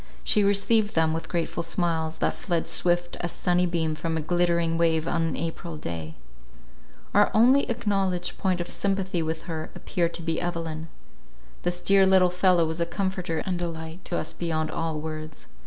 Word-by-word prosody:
She 210 - +3
received 205 +2 +2
them 160 -1 +3
with 165 - -4
grateful 170 -1 -1
smiles, 165 -2 -1
that - - +1
fled 170 -4 -2
swift 175 0 0
as 175 - -3
sunny 180 0 +1
beam 165 -2 0
from 160 +1 -2
a - - -1
glittering 170 0 +1
wave 165 -1 +2
on 170 - +1
an 165 0 0
April 165 0 -4
day. 80 - -5 1.0
Our 205 +1 +5
only 255 +6 +5
acknowledged 195 -6 0
point 185 -2 +1
of 175 - -3
sympathy 190 -3 -1
with 160 0 -3
her, 160 -2 -5
appeared 170 -3 -1
to 170 - -6
be 165 0 -1
Evelyn. 165 -2 -3 0.7
This 175 0 -2
dear 195 -1 +5
little 185 -2 +5
fellow 180 -2 +4
was 160 +1 -3
a 170 - +1
comforter 180 -2 -2
and 180 -2 -1
delight 165 0 -5
to 175 - -1
us - - -3
beyond 155 -2 -2
all 160 -2 -2
words. 155 0 -7
170 Hz, 175 wpm, -26 LUFS, 160-185 Hz, 1.0 s, Our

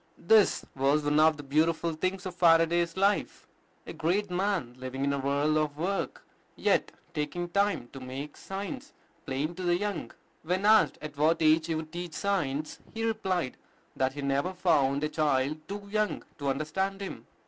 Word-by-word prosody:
This 215 +2 +4
was 140 +3 +2
one 145 +1 +2
of 155 -1 +5
the 145 - -8
beautiful 160 +4 +1
things 185 +4 -2
of 185 - -4
Faraday's 170 0 +3
life, 200 +2 +1 0.4
a - - -7
great 180 +5 0
man 180 -9 -1
living 130 +1 -4
in 140 0 +1
a 140 - -1
whirl 140 +3 +1
of 150 -1 -1
work, 190 +5 -2 0.3
yet - - +1 0.2
taking 155 +4 -2
time 200 -7 +1
to 135 - -7
make 130 +3 -7
science 205 +9 -6 0.3
plain 140 +5 -1
to 185 - -8
the 175 -1 +2
young. 205 -2 -3 0.3
When 180 +4 -1
asked 215 0 +5
at 150 -1 -7
what 155 +3 +3
age 155 +1 +4
he 165 - -1
would 155 0 -5
teach 175 -1 -6
science, 155 -7 -1 0.2
he 225 - -2
replied 190 - -1 0.4
that 130 -1 0
he 145 - -6
had - - -3
never 140 +7 0
found 145 -6 +2
a 150 - +1
child 150 -1 +1
too 200 +2 -5
young 215 0 0 0.2
to 140 -1 -1
understand 190 +8 -1
him. 195 - -7
160 Hz, 180 wpm, -29 LUFS, 145-190 Hz, 0.4 s, of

